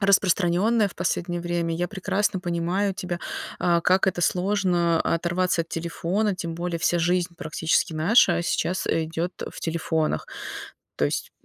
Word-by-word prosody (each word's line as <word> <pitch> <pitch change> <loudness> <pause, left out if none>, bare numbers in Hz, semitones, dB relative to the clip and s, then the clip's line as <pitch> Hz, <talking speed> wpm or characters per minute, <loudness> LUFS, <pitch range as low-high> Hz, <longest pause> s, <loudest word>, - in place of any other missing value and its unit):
распространённая 200 +2 +3
в - - -14
последнее 175 0 -1
время. 170 -1 -1
Я 175 +2 -1
прекрасно 195 -1 -1
понимаю 180 +3 -1
тебя, 180 -1 -4 0.4
а, 170 -1 +2
как 185 +3 +3
это 180 -2 0
сложно 180 -2 +2
оторваться 175 +1 +1
от 165 - -16
телефона, 175 +5 -1
тем 170 -2 -5
более 170 0 -3
вся 175 +2 +2
жизнь 175 +1 +1
практически 160 +1 0
наша 170 +1 +4
сейчас, 180 +1 -1
э, 165 - +1
идёт, 165 +3 -3
э, - - -5
в - - -9
телефонах. 160 - -1 0.7
То 75 - +1
есть, 70 - -2
175 Hz, 150 wpm, -25 LUFS, 170-185 Hz, 0.7 s, наша